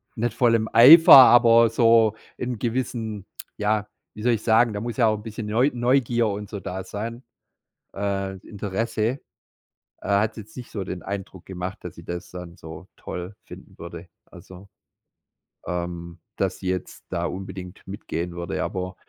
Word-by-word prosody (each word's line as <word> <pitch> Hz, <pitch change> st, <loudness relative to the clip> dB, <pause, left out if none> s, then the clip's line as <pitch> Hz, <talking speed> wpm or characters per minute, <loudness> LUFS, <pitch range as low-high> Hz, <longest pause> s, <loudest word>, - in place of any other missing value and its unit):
nicht 120 Hz, +1 st, -2 dB
voll 120 Hz, -3 st, +3 dB
dem 110 Hz, -1 st, +1 dB
Eifer, 160 Hz, +9 st, +9 dB
aber 115 Hz, -3 st, +7 dB
so 115 Hz, -1 st, +4 dB, 0.2 s
in 125 Hz, -2 st, -4 dB
gewissen, 115 Hz, -3 st, -3 dB, 0.3 s
ja, 105 Hz, 0 st, 0 dB, 0.3 s
wie 105 Hz, -, -9 dB
soll 120 Hz, 0 st, +3 dB
ich 110 Hz, -, -3 dB
sagen, 115 Hz, 0 st, +3 dB
da 105 Hz, -, -4 dB
muss 120 Hz, +2 st, -5 dB
ja 115 Hz, -, +4 dB
auch 110 Hz, 0 st, +1 dB
'n 105 Hz, -, -11 dB
bisschen 110 Hz, -1 st, -7 dB
Neu 120 Hz, +6 st, +2 dB
Neugier 120 Hz, -1 st, +1 dB
und 100 Hz, 0 st, -5 dB
so 105 Hz, -2 st, -6 dB
da 95 Hz, 0 st, -6 dB
sein, 115 Hz, +6 st, -6 dB, 0.7 s
äh, 95 Hz, -1 st, -3 dB
Interesse. 110 Hz, +4 st, -2 dB, 0.8 s
Äh, -, -, -9 dB
hat 105 Hz, +3 st, +1 dB
jetzt 110 Hz, 0 st, -11 dB
nicht 125 Hz, -, -8 dB
so 100 Hz, -, -4 dB
den 90 Hz, -1 st, -6 dB
Eindruck 95 Hz, -2 st, -7 dB
gemacht, 90 Hz, 0 st, -6 dB
dass -, -, -9 dB
sie -, -, -12 dB
das 85 Hz, 0 st, -7 dB
dann 90 Hz, -1 st, -9 dB
so 80 Hz, +3 st, -11 dB
toll 90 Hz, +3 st, -7 dB
finden -, -, -14 dB
würde. 85 Hz, +1 st, -9 dB, 0.2 s
Also, 95 Hz, +2 st, -14 dB, 1.0 s
ähm, 85 Hz, 0 st, -5 dB, 0.2 s
dass 95 Hz, -1 st, -2 dB
sie 95 Hz, -, -6 dB
jetzt 90 Hz, -1 st, -5 dB
da -, -, -2 dB
unbedingt 95 Hz, 0 st, -7 dB
mitgehen 90 Hz, -3 st, -5 dB
würde. 85 Hz, 0 st, -4 dB
Aber 90 Hz, 0 st, -4 dB
105 Hz, 165 wpm, -23 LUFS, 95-115 Hz, 1.0 s, Eifer